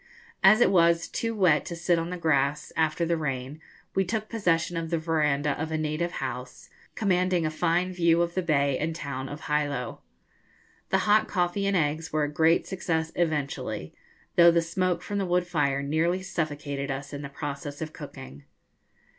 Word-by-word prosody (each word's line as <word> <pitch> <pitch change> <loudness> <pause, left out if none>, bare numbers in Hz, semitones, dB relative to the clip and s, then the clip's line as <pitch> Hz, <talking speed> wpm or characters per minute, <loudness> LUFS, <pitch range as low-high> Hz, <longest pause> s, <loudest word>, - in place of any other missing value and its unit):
As 215 +4 +7
it 240 - +5
was 170 -2 +4
too 230 -1 -3
wet 180 -7 +4
to 170 - -5
sit 170 0 +1
on 165 +1 -3
the 180 - -4
grass 150 -3 0
after 160 +1 +1
the 170 0 +1
rain, 135 0 -4 0.3
we 195 - +2
took 215 +3 -3
possession 175 -6 0
of 165 -1 -3
the 170 - +1
verandah 150 -3 +1
of 160 0 -3
a 160 - 0
native 155 +3 -2
house, 125 -1 -6 0.2
commanding 185 -4 +1
a 155 - 0
fine 175 +4 0
view 170 -1 +3
of 170 0 -3
the 185 - 0
bay 140 -5 +1
and 160 +1 -2
town 135 -4 -5
of 145 +2 -8
Hilo. 145 -5 -1 0.9
The - - +3
hot 215 +1 +4
coffee 180 +1 0
and 200 -1 +2
eggs 160 +1 -1
were 155 0 +1
a 145 0 -2
great 160 +2 +3
success 165 -4 -2
eventually, 140 - -2 0.4
though 170 0 +9
the 170 0 +3
smoke 185 +1 -1
from 205 0 -3
the 195 - 0
wood 180 0 +2
fire 140 -5 0
nearly 165 +6 0
suffocated 145 -5 -3
us 135 +1 -5
in 145 - -5
the 140 - -6
process 145 0 -6
of 155 -1 -5
cooking. 70 +2 -10
160 Hz, 185 wpm, -27 LUFS, 145-175 Hz, 0.9 s, though